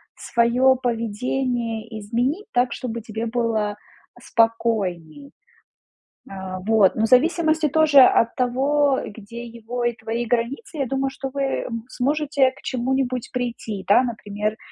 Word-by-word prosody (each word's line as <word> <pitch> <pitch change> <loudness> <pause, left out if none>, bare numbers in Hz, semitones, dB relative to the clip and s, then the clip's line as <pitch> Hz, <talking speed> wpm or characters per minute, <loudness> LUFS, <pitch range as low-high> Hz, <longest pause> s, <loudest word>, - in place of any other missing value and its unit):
своё 245 +3 +3
поведение 230 -1 -2
изменить 245 - -1
так, 245 0 +2
чтобы 235 -3 -5
тебе 220 +1 -5
было 225 -3 -1 0.4
спокойнее. 225 - 0 1.0
А, 190 -1 -6
вот. 215 -1 +3
Но 220 - 0
в - - 0
зависимости 315 +3 +3
тоже 300 -1 +6
от 230 -2 +4
того, 270 +3 +2
где 230 +2 -9
его 235 +1 -6
и 240 - +1
твои 230 +1 -3
границы, 250 - -2
я 270 - 0
думаю, 270 +1 -1
что 270 0 -6
вы, 280 - -2 0.2
м, 230 -2 -6
сможете 280 0 +1
к 265 - -18
чему-нибудь 255 -1 -1
прийти, 230 -5 -4
да? 205 +5 +5
Например, 215 -2 -3
240 Hz, 130 wpm, -22 LUFS, 225-265 Hz, 1.0 s, тоже